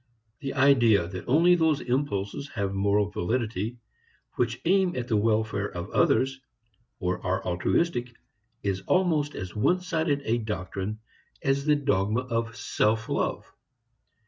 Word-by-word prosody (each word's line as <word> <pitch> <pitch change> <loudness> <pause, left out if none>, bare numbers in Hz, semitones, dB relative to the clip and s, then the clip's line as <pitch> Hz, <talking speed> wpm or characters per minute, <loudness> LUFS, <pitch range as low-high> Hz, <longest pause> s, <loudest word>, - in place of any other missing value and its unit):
The 135 -2 -5
idea 120 -10 +4
that 90 0 -7
only 165 +7 +5
those 160 -4 +3
impulses 125 -2 -2
have 100 -3 -1
moral 100 +1 +1
validity 110 +2 -2 0.6
which - - -1
aim 185 0 +3
at 125 -1 -3
the 115 - +1
welfare 105 -1 +1
of 90 +3 -6
others, 135 0 +2 0.6
or 90 -3 -2
are 90 +1 -1
altruistic, 120 - 0 0.5
is 95 -1 -1
almost 160 -6 +2
as 90 -1 -6
one 175 +12 +2
sided 160 -5 -1
a 115 +2 +1
doctrine 105 0 -4 0.4
as 135 +1 +1
the 150 -1 +4
dogma 110 -5 +1
of 115 -2 -3
self 110 +1 0
love. - - -2
115 Hz, 135 wpm, -27 LUFS, 100-140 Hz, 0.6 s, only